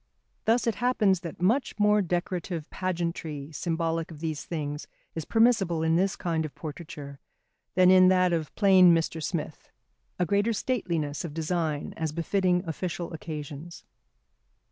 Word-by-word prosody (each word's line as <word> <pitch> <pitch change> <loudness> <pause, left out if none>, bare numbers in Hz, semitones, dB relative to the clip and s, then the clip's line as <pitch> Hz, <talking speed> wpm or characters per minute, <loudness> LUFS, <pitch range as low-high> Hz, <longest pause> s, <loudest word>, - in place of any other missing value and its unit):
Thus 230 +2 +3
it 230 - +2
happens 215 -7 +3
that 170 -2 -8
much 240 +9 +1
more 210 0 +4
decorative 175 -2 -2
pageantry 170 -5 -3
symbolic 165 0 -2
of 160 -3 -10
these 155 -2 -4
things 150 -3 -4 0.3
is 160 -2 -5
permissible 210 -8 +3
in 160 0 +2
this 190 +2 +2
kind 165 -2 -1
of 155 - -7
portraiture 150 -3 -8 0.6
than 185 0 +6
in 185 0 +7
that 185 -1 +4
of 160 -3 -2
plain 185 -4 +6
Mr. 165 0 -1
Smith; 155 -2 -4 0.5
a 180 - +1
greater 205 +6 +1
stateliness 170 - -2
of 160 -3 -6
design 160 -2 -2
as 160 -2 -2
befitting 180 +2 +1
official 170 +1 -4
occasions. 155 +1 -7
170 Hz, 145 wpm, -27 LUFS, 160-185 Hz, 0.6 s, in